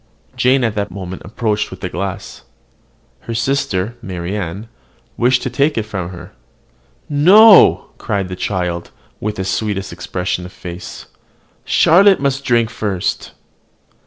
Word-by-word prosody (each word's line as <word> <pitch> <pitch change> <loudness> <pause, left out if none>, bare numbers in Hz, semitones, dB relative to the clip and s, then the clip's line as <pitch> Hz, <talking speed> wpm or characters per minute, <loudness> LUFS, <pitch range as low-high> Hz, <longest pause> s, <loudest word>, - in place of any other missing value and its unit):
Jane 130 +1 +2
at 115 -3 0
the 105 -1 -2
moment 95 0 -7
approached 105 +1 -2
with 95 0 -11
the - - -2
glass. 100 +1 -5 0.8
Her 115 - -6
sister, 115 -4 -1
Marianne, 95 +1 -5 0.5
wished 125 +1 +2
to - - -2
take 145 0 +1
it 110 - +1
from 100 -5 -5
her. 90 -2 -11 0.7
"No!" 190 +8 +6
cried 100 -2 -2
the 90 - -6
child, 90 -3 -3 0.3
with 105 0 -3
the 95 - -4
sweetest 100 0 -2
expression 90 0 -3
of 90 - -9
face, 90 0 -9 0.6
"Charlotte 195 +4 +5
must 140 0 -1
drink 120 -3 +1
first." 100 -4 -3
105 Hz, 130 wpm, -17 LUFS, 95-125 Hz, 0.8 s, No